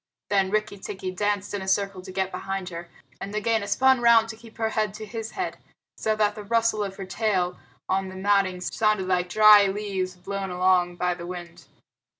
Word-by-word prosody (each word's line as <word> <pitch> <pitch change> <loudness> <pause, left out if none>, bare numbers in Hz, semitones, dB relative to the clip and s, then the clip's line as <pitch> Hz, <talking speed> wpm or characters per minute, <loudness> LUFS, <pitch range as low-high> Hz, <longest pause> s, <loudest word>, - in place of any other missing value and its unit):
Then 195 -2 +2
Rikki 210 -1 -1
tikki 190 -1 -5
danced 205 +1 -1
in 205 - -2
a 190 - -6
circle 195 0 0
to 185 +1 -10
get 190 0 -1
behind 195 -1 -4
her, 170 0 -8 0.3
and 200 - -6
Nagaina 215 0 0
spun 265 +1 +3
round 230 -1 +5
to 220 - -6
keep 225 0 -16
her 225 -1 0
head 215 -2 -1
to 215 0 -7
his 225 +1 -6
head, 375 - -4 0.4
so 215 0 0
that 210 -1 +2
the 210 - -8
rustle 225 0 +1
of 195 -1 -5
her 195 - -7
tail 185 -3 -1 0.3
on 190 0 0
the 185 - -9
matting 190 -1 +1
sounded 215 0 +1
like 180 -1 0
dry 210 +1 +7
leaves 195 -2 -3
blown 195 +2 -5
along 180 -1 +2
by 180 0 0
the 175 0 -8
wind. 175 -1 -8
195 Hz, 200 wpm, -25 LUFS, 185-215 Hz, 0.4 s, dry